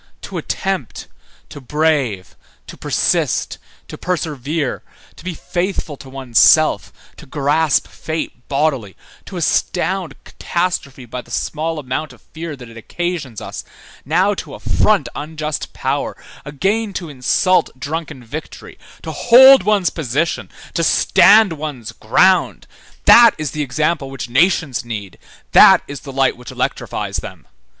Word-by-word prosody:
To - - -6
attempt, 190 - -4 0.4
to 145 -2 -10
brave, 140 -9 -1 0.3
to - - -10
persist, - - 0 0.3
to - - -10
persevere, 155 -4 -3 0.3
to - - -15
be 180 -2 -5
faithful 175 -4 -3
to 135 - -12
one's 130 -4 -1
self, - - +4 0.3
to - - -13
grasp 145 +2 +1
fate 155 -6 -6
bodily, 135 -8 -1 0.3
to 190 - -7
astound 175 0 -1
catastrophe 170 -7 -3
by 125 +2 -6
the 120 - -22
small 160 +6 -3
amount 145 +1 -4
of 120 - -21
fear 160 -1 -6
that 125 -3 -12
it 115 0 -13
occasions 160 - -4
us, - - -7 0.4
now 180 +8 +2
to - - -7
affront 215 -3 +1
unjust 155 0 -5
power, - - -3 0.3
again 195 +9 -1
to 175 -2 -5
insult 150 +7 +1
drunken 150 -2 -5
victory, 145 +7 -9 0.2
to - - -5
hold 265 +3 +7
one's 205 -4 +1
position, 155 +3 -2 0.2
to 170 - 0
stand 200 +4 +5
one's 145 -7 -6
ground; 185 +12 +2 0.4
that 235 -2 +8
is 155 -3 -3
the 150 - -4
example 145 +2 -1
which 135 -3 -6
nations 150 -1 +2
need, 105 -5 -7 0.3
that - - +7
is 145 - -7
the 140 - -10
light 135 0 +1
which 125 0 -12
electrifies - - -3
them. - - -8
155 Hz, 135 wpm, -18 LUFS, 130-175 Hz, 0.4 s, that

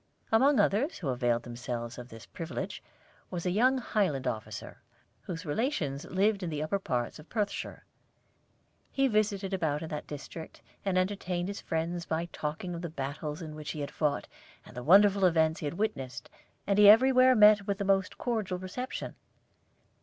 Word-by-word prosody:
Among 265 +5 +5
others 250 - +2
who 150 - -3
availed 120 -2 +1
themselves 120 0 -5
of 125 0 -9
this 115 -1 -11
privilege 160 -8 -6 0.5
was 175 -1 -5
a 180 - +1
young 250 +7 +3
Highland 195 - 0
officer, 110 -3 -5 0.4
whose 180 0 -6
relations 150 - -1
lived 200 +2 +1
in 180 - -3
the 150 -1 -2
upper 175 +6 -1
parts 125 -6 -2
of 150 - -14
Perthshire. 210 -3 -3 1.1
He 270 0 +2
visited 205 -4 0
about 160 -5 0
in 160 - -6
that 150 -1 -5
district, 150 +3 -9 0.2
and 195 -2 0
entertained 185 -1 -1
his 200 - -5
friends 170 +1 -3
by 160 +1 -1
talking 155 +4 -4
of 170 - -5
the 170 - -4
battles 150 +2 -5
in 155 -1 -7
which 150 -1 -6
he 150 - -5
had 140 - -4
fought, 150 -2 -1 0.4
and - - -14
the 125 - -5
wonderful 195 +6 +6
events 160 -2 +3
he - - -5
had 145 - -4
witnessed; 135 - -3 0.3
and 200 0 +2
he 205 -1 +9
everywhere 255 +3 +7
met 210 -2 +6
with 200 -1 0
the 200 - -2
most 195 -1 +1
cordial 215 -7 -2
reception. 185 +8 -5
175 Hz, 175 wpm, -30 LUFS, 150-205 Hz, 1.1 s, he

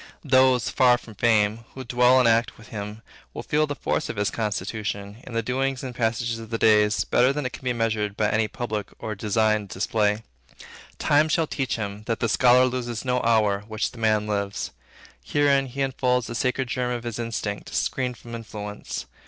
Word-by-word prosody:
Those 130 -4 +4
'far 120 +4 +4
from 115 -2 -13
fame,' 110 0 +2 0.2
who 130 - -6
dwell 125 +1 +4
and 125 -2 +5
act 115 +1 +2
with 110 - -15
him, 105 +1 -6 0.3
will - - -5
feel 150 +1 +1
the 145 - -3
force 155 - -2
of - - -4
his 105 0 0
constitution 105 -1 -3
in 125 - -8
the 115 0 0
doings 130 +2 -1
and 130 -2 -5
passages 115 0 -1
of 115 -1 -9
the 115 - -1
day 105 -1 +5 0.2
better 125 +2 +5
than 145 0 -3
it 130 - -3
can - - -10
be 125 - 0
measured 110 -3 -1
by 105 - +2
any 110 0 +2
public 110 -3 -4
and 110 -2 -5
designed 110 -1 +1
display. 105 +2 0 0.7
Time 150 +2 +3
shall 165 +1 +2
teach 135 -4 -2
him, 105 -2 -5
that 115 -2 -1
the 115 - +1
scholar 125 +2 +5
loses 125 -2 -3
no 125 0 +1
hour 110 -4 +3
which 110 0 -2
the 120 - -13
man 110 -1 +2
lives. 100 -1 -2 0.5
Herein 140 -2 +2
he 135 +2 -2
unfolds 125 -2 +1
the 115 - -6
sacred 130 +2 0
germ 125 0 -1
of 120 -1 -3
his 120 -1 -5
instinct, 110 -3 -4
screened 125 -2 -1
from 120 +1 -11
influence. 105 -2 -6
115 Hz, 195 wpm, -25 LUFS, 105-125 Hz, 0.7 s, and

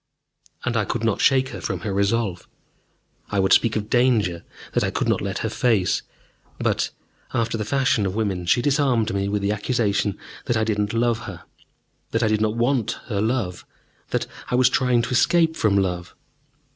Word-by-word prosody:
And 125 -1 -1
I 110 - +2
could 115 +3 -3
not 115 -3 +1
shake 130 -1 +3
her - - -7
from - - -3
her 105 -3 -3
resolve. 100 -2 0 0.8
I 100 - 0
would 95 0 +4
speak 115 -1 +4
of 105 -1 -2
danger 110 -9 +2 0.3
that - - +2
I - - +1
could - - -2
not - - +1
let - - -3
her - - 0
face. 110 -8 +1 0.6
But, - - 0 0.5
after 115 0 0
the 110 - -2
fashion 125 -3 +1
of 95 - -4
women, 95 -5 -2
she 120 +7 +3
disarmed 135 -7 +2
me 100 0 -1
with 100 0 -1
the 100 - +1
accusation 105 -2 0 0.3
that 120 -4 +1
I 110 - +1
did 110 -2 -1
not 105 +1 -1
love 115 0 +1
her, 85 -4 -9 0.7
that 115 +1 0
I - - +3
did 110 0 +1
not 110 0 +1
want 120 -1 +1 0.2
her 100 -3 0
love, 110 -6 -1 0.5
that - - -1 0.2
I - - +1
was 125 -1 +5
trying 125 -2 +2
to 130 - -4
escape 160 +5 +3
from 105 -7 +2
love. 90 -3 -2
110 Hz, 195 wpm, -23 LUFS, 100-120 Hz, 0.8 s, was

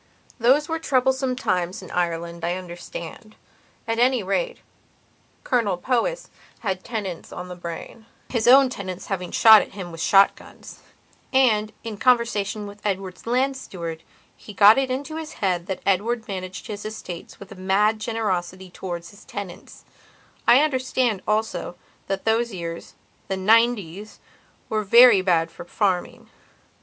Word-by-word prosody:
Those 265 +6 +4
were 325 -1 -2
troublesome 265 -3 +1
times 185 -6 -2
in 185 - -11
Ireland, 170 -1 -2
I 175 +1 0
understand. 180 +3 -9 0.5
At 225 0 -1
any 250 -2 +3
rate, 475 - -1 0.9
Colonel 220 -7 +1
Powys 255 - -1 0.3
had 190 -4 -2
tenants 205 -8 -5
on 180 0 -7
the 180 - -7
brainhis 220 +7 -6
own 265 +1 +7
tenants 185 -5 -6
having 180 -2 -4
shot 220 -2 +8
at - - -8
him 185 -3 -7
with 165 0 -8
shot 195 +2 +5
guns. - - -14 0.5
And, 220 -5 +3
in 225 -2 -6
conversation 220 -3 +1
with 205 0 -11
Edward's 190 -1 -4
land 260 +3 +1
steward, 170 -10 -7 0.3
he 210 - -12
got 210 +5 +7
it 265 -1 -1
into 285 +5 -4
his 315 -1 -7
head 180 -3 -1
that 190 - -5
Edward 220 +4 0
managed 185 -1 -6
his 210 -1 -6
estates 200 -5 -8
with 200 +1 -12
a - - -9
mad 200 +4 +1
generosity 190 -5 -3
towards 175 -2 -6
his 200 - -16
tenants. 200 -4 -9 0.6
I 255 - +7
understand, 255 -7 0
also, 215 -4 -1 0.3
that 195 - -3
those 230 +1 +1
yearsthe 170 -3 -7 0.3
'ninetieswere 205 -1 +1 0.6
very 235 0 +7
bad 165 -3 +1
for - - -10
farming. 185 0 -2
205 Hz, 140 wpm, -23 LUFS, 185-240 Hz, 0.9 s, shot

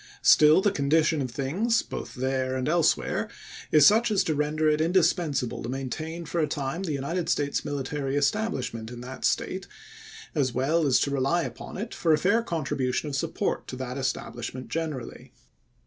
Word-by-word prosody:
Still 155 +4 +7
the 205 - +3
condition 155 0 +2
of 130 - -2
things, 170 - 0
both - - -7
there 130 0 -1
and 130 +1 -2
elsewhere, 165 0 +1 0.4
is 150 - +7
such 225 +3 +5
as 205 -3 +2
to 160 - 0
render 150 +1 0
it 155 0 +3
indispensable 160 -6 +1
to 115 - -5
maintain 155 +6 -4
for 170 - -2
a 155 - +1
time 145 +3 -3
the 185 -5 -3
United 150 +5 -2
States 145 -1 0
military 140 0 -3
establishment 140 - -1
in 120 0 -8
that 130 +1 -6
State, 190 +1 -1 0.7
as 135 -6 0
well 150 +5 +2
as 130 - +4
to 140 - 0
rely 140 +5 +1
upon - - -7
it 210 +5 -5
for 165 -2 +2
a - - +4
fair 200 +8 +2
contribution 145 - -2
of 140 - -3
support 135 - -2
to - - -6
that 130 -1 -5
estabhshment 130 -1 -4
generally. 155 -6 -5
150 Hz, 175 wpm, -27 LUFS, 130-170 Hz, 0.7 s, Still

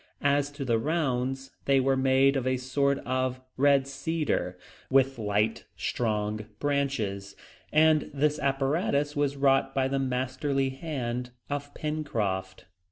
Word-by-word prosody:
As 145 0 +2
to 145 -1 -5
the 115 -3 +2
rounds, 135 -3 -1
they 135 -1 +4
were 135 +1 +2
made 135 +1 +4
of 130 -2 -1
a 130 0 +2
sort 140 +2 +1
of 130 0 -1 0.2
red 140 0 +4
cedar, 140 - -2 0.3
with 135 -1 +3
light, 105 +1 0
strong 105 -2 -2
branches; 115 -9 -1 0.4
and 155 0 +4
this 150 +2 +1
apparatus 140 +2 0
was 145 -1 0
wrought 135 -1 +2
by 135 -1 +2
the 135 0 -1
masterly 130 +1 0
hand 125 -4 -4 0.2
of 145 0 -3
Pencroft. 105 -13 -3
135 Hz, 130 wpm, -28 LUFS, 125-145 Hz, 0.4 s, they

